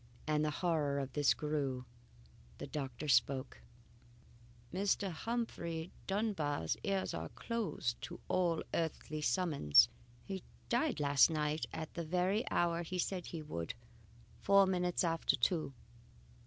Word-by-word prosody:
As 150 -1 +2
the 155 - +2
horror 150 -3 0
of 135 -1 -3
this 145 -2 +3
grew, 140 -4 -2 0.7
the - - -5
doctor 140 0 -5
spoke: 135 -2 +2 1.1
"Mr. 195 0 +1
Humphrey 170 -5 -3 0.2
Dunbar's 190 - 0
ears 195 -1 0
are - - -4
closed 225 - -2
to - - -7
all 175 -3 +1
earthly 155 -2 -2
summons. 145 - +5 0.3
He 190 -1 -5 0.3
died 245 - +1
last 140 0 +5
night 155 -1 -1
at 160 - -5
the 170 - -3
very 180 +6 +1
hour 170 -1 +1
he 180 +2 -4
said 180 0 -2
he 165 -2 -5
would 85 - -4 0.7
four 200 0 +6
minutes 180 -2 +1
after 165 -1 +2
two." 155 +4 +1
165 Hz, 130 wpm, -35 LUFS, 145-185 Hz, 1.1 s, four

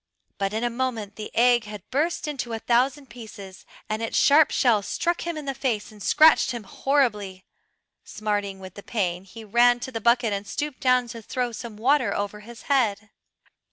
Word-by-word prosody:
But 195 -1 0
in 220 +2 -2
a 240 - 0
moment 230 -5 -3
the 215 - -7
egg 240 -1 +4
had 210 -3 -9
burst 305 +4 0
into 265 -6 -4
a - - -1
thousand 255 +5 +1
pieces, 215 -5 -11 0.2
and 215 +1 -3
its 225 - -2
sharp 295 +1 +6
shell 230 -5 +3
struck 340 - -2
him 340 -2 -3
in 300 - -6
the 275 - -2
face 245 -7 -2
and 210 -1 -15
scratched 315 +9 +5
him 240 -3 -4
horribly. 210 -6 -1 0.6
Smarting 205 -2 -3
with 190 +1 -10
pain 185 -5 -2
he 225 +4 -11
ran 240 +3 +4
to 260 - -5
the 225 -2 -5
bucket 235 -1 +3
and 200 0 -4
stooped 295 -2 -4
down 255 -2 +3
to 230 0 -8
throw 245 +2 -3
some 230 -2 -8
water 260 +3 +2
over 205 +1 -3
his 230 +2 -12
head. 215 -7 0
230 Hz, 190 wpm, -25 LUFS, 210-255 Hz, 0.6 s, sharp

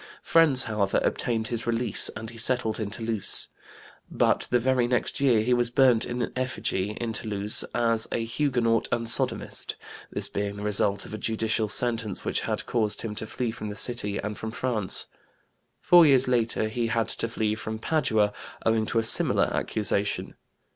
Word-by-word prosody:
Friends, 150 -6 +5
however, 105 -3 0
obtained 115 -2 -1
his 115 -1 -3
release 115 -2 0
and 110 +1 -7
he 115 - -13
settled 115 -2 +2
in 105 -2 -3
Toulouse. 110 -1 -2 0.6
But - - +1
the 125 - +3
very 125 0 +1
next 125 0 -1
year 125 -6 +3
he 125 +2 +1
was 120 -1 +1
burnt 125 -2 +3
in 120 0 -3
effigy 115 -6 -2
in 115 -1 -3
Toulouse, 105 -1 +4
as 115 -2 +1
a 115 - -2
Huguenot 115 -3 0
and 115 - -1
sodomist, 115 - 0 0.4
this - - -3
being 100 0 -4
the 105 - -7
result 100 -1 0
of - - -10
a 110 - -5
judicial 110 0 -1
sentence 115 -4 -1
which - - -1
had - - -3
caused 110 -3 -1
him 110 -2 -4
to 110 +1 -6
flee 120 +1 -3
from 105 -1 -7
the 105 - -6
city 105 -2 0
and 105 0 -5
from 110 - -5
France. 110 -5 -2 0.8
Four 175 -2 +6
years 135 -2 +5
later 115 -3 0
he 115 +1 -2
had 115 0 0
to - - 0
flee 110 -2 -1
from 110 0 -5
Padua 110 -6 0 0.3
owing 110 -1 +1
to - - -2
a 115 - +2
similar - - +3
accusation. 100 -1 -1
115 Hz, 175 wpm, -26 LUFS, 110-120 Hz, 0.8 s, Four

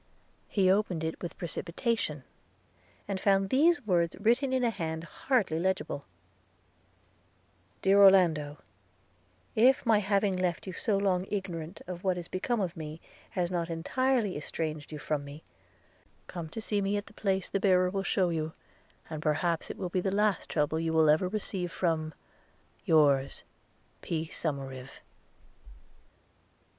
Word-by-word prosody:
He 190 -3 +3
opened 190 -5 +1
it 160 0 -3
with 175 - -6
precipitation, 170 - -2 0.8
and 195 -2 -2
found 195 0 +2
these 295 0 +4
words 170 -4 +1
written 240 +5 +2
in 260 -1 +1
a 235 - +2
hand 160 -4 -4
hardly 190 - 0
legible: 185 -5 -1 1.8
'DEAR 195 +1 +5
ORLANDO, 160 -6 +4 1.0
'IF 255 +5 +4
my 225 -3 +5
having 200 -1 +1
left 180 -2 -1
you 190 - -6
so 200 +3 0
long 190 -2 +1
ignorant 180 -4 -4
of 180 -1 -7
what 185 -2 +1
is 175 -1 -6
become 230 +5 -1
of 180 -3 -2
me, 155 -1 -7 0.3
has 180 -1 -1
not 170 -1 -1
entirely 225 +6 0
estranged 155 0 -4
you 155 - -5
from 150 -1 -2
me 145 +2 -10 0.4
– - - -35
come 165 -3 -4
to 210 +2 -2
me 200 +1 0
at 205 - -4
the - - -15
place 195 -2 -1
the 195 - -1
bearer 185 -2 +4
will 195 0 -1
shew 185 -2 +1
you, 160 -1 -2 0.5
and 155 -2 -6
perhaps 160 +2 0
it - - -6
will 185 - -3
be 180 +1 0
the 195 - 0
last 210 -2 +1
trouble 150 +2 0
you 165 0 -1
will 160 -1 +5
ever 160 +4 +2
receive 185 -3 -3
from 160 -3 -1 0.7
Yours,P. 150 +2 0
SOMERIVE.' 135 -5 -5
180 Hz, 145 wpm, -30 LUFS, 160-200 Hz, 1.8 s, DEAR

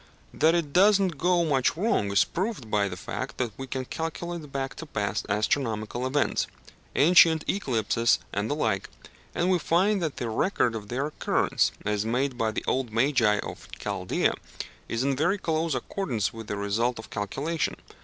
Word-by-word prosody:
That 160 +3 +4
it 155 -5 -1
does 200 +2 +6
not 180 -7 -1
go 175 -1 +3
much 140 0 +1
wrong 170 - +1
is 100 - +5
proved 180 - -4
by 100 -1 +2
the - - -6
fact - - -5
that 125 -3 -1
we 135 - -7
can 130 0 -3
calculate 165 0 -5
back 135 -1 -3
to 165 - -7
past 100 -7 -2
astronomical 110 +2 0
events 145 +2 +1 0.5
ancient 160 0 +6
eclipses 120 - +1 0.2
and 100 +2 -1
the 145 - 0
like 110 -10 -1 0.5
and 180 +2 +2
we 180 - +3
find 185 +6 +2
that 160 -4 -2
the 120 - -2
record 120 - +1
of 105 -2 -6
their 130 +5 -1
occurrence, 150 - +1
as 105 0 0
made 125 +4 0
by 115 -2 0
the 110 - -4
old 130 -3 0
magi 115 -3 +3
of - - -8
Chaldæa, - - 0 0.6
is 115 +2 -1
in 140 0 +1
very 175 +8 +2
close 160 -4 -1
accordance 125 - -2
with 115 -1 -8
the 105 - -3
result 110 +5 0
of 110 - -10
calculation. 140 +11 -2
135 Hz, 175 wpm, -27 LUFS, 110-165 Hz, 0.6 s, does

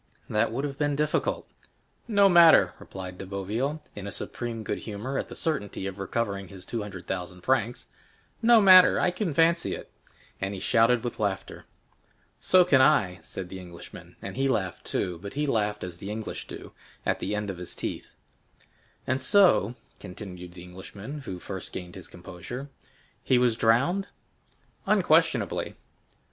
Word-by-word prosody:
"That 105 +1 +1
would 130 +5 -2
have 140 -1 -4
been 145 -1 +1
difficult." 150 +1 0 0.6
"No 200 -3 +5
matter," 170 -3 +7
replied 95 -1 -8
De - - -6
Boville, 110 +11 -3
in 100 0 -6
supreme 115 +2 -5
good - - -3
humor 115 +6 -4
at - - -4
the - - -8
certainty 105 -12 -2
of 95 0 -5
recovering 100 -1 -2
his 95 0 -11
two 115 - -3
hundred 100 -3 -8
thousand 90 -1 -5
francs,—"no 130 - 0
matter, 185 -3 +8
I 180 - +2
can 180 -1 -2
fancy 165 +2 +3
it." - - -11 0.5
And 95 +1 -2
he - - -6
shouted 115 +4 +3
with 120 - -4
laughter. 100 -2 -3 0.7
"So 185 -1 +5
can 140 -7 +5
I," 110 -11 +3
said 90 -2 -6
the 95 - -7
Englishman, 90 -2 -11
and - - -6
he 135 0 +2
laughed 95 -9 -1
too; 90 -2 -2
but 100 0 -7
he 150 +1 0
laughed 105 -6 0
as 90 -1 -7
the 100 - -6
English 110 0 -5
do, - - -9 0.3
"at - - 0
the 105 - -2
end 105 -1 -2
of 90 - -9
his 90 - -6
teeth." - - -5 0.9
"And 130 +1 0
so," 175 - +4 0.2
continued 90 -2 -9
the 90 -1 -11
Englishman 100 +9 -8
who 95 - -5
first 95 +1 -7
gained 90 -1 -7
his 95 - -10
composure, 90 +11 -8 0.5
"he 130 - +3
was 125 -2 +3
drowned?" 140 - +2 0.8
"Unquestionably." - - +2
110 Hz, 160 wpm, -27 LUFS, 95-140 Hz, 0.9 s, matter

